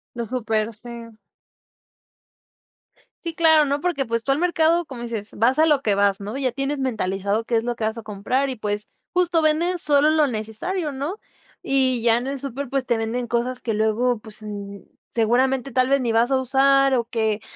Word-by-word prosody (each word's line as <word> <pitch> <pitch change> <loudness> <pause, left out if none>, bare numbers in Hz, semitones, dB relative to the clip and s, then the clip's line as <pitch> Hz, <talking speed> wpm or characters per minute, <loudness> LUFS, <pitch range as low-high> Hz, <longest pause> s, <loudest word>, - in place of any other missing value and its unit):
Los 235 -2 -4
súpers, 225 -3 -1
sí. 235 0 -9 2.1
Sí, 335 -2 -4
claro, 320 -2 +5
¿no? 285 +1 -1
Porque, 350 -6 0
pues, 230 0 -1
tú 270 - 0
al 275 - +1
mercado, 340 -1 +2
como 255 -5 -8
dices, 225 -3 -4
vas 250 +7 +2
a 320 - +5
lo 290 -3 +2
que 210 - +2
vas, 200 0 +2
¿no? 205 +5 -5
Ya 265 -2 0
tienes 275 +3 -2
mentalizado 205 -4 -1
qué 235 - -1
es 225 - +2
lo 240 0 -2
que 230 - -6
vas 220 +1 0
a - - -7
comprar 220 +6 -1
y, 260 - -3
pues, 210 -1 -3 0.3
justo 350 -2 +2
venden 330 +4 +2
solo 295 -2 +3
lo 310 -1 +4
necesario, 265 - -3
¿no? 285 +10 -4 0.4
Y 260 -3 +2
ya 230 0 +4
en 245 - -3
el 275 +1 -3
súper, 275 +1 -5
pues, 270 -1 -1
te 235 - +2
venden 230 +2 -2
cosas 240 +2 -1
que 225 -3 -2
luego, 220 +3 +1
pues, 215 0 -10
mm, 200 -1 -7 0.3
seguramente 255 +3 +1
tal 255 +1 +2
vez 275 0 +3
ni 240 -2 0
vas 230 +3 +2
a 265 - +4
usar 275 +1 +3
o 235 -2 0
que, 220 -3 -1
250 Hz, 200 wpm, -22 LUFS, 225-275 Hz, 2.1 s, claro